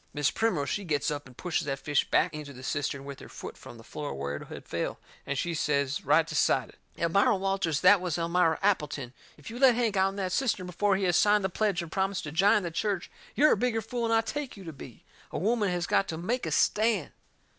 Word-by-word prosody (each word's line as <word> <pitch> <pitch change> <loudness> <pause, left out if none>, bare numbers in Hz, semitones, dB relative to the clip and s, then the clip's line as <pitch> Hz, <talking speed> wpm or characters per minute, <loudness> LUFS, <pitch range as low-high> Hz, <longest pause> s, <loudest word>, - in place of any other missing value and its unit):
Mis' 145 -2 +2
Primrose, 220 -11 0
she 205 - -2
gets 150 -5 0
up 145 -2 -5
and 125 - -17
pushes 175 -3 -2
that 135 -1 -1
fish 145 0 0
back - - +2
into 150 -2 -7
the 130 0 -11
cistern 140 0 -2
with 140 -1 -8
her - - -11
foot - - -8
from - - -12
the - - -13
floor 70 - -6
where 70 +1 -3
it - - -10
had - - -9
fell, - - -3 0.3
and 140 - -2
she 170 +4 -1
says 140 -3 0
right - - +4
decided: - - 0 0.2
"Elmira 200 +8 +3
Walters, 190 -5 0
that 190 +1 +6
was 175 -3 -2
Elmira 170 -1 +2
Appleton, 150 -10 0 0.2
if 150 - -10
you 240 - -7
let 260 -3 +6
Hank 230 -4 0
out'n 190 0 +2
that 190 -2 -2
cistern 220 -5 0
before 195 +3 +1
he 195 - -1
has 175 -2 +2
signed 210 -1 +4
the 190 - 0
pledge 195 -2 0
and 165 - -10
promised 195 0 -1
to 150 - -5
jine 195 +5 +4
the 170 - -3
church 195 +1 -2 0.2
you're 305 +1 +5
a - - +5
bigger 225 +1 0
fool 235 +2 -3
'n 230 - 0
I 225 0 +4
take 270 +2 -5
you 195 - -10
to 165 -3 -7
be. 130 -4 -12 0.3
A - - -3
woman 210 +2 +1
has 175 -1 -1
got 195 - +2
to 160 - -4
make 235 +9 -2
a - - -3
stand!" 215 -6 +2
180 Hz, 240 wpm, -28 LUFS, 150-205 Hz, 0.3 s, that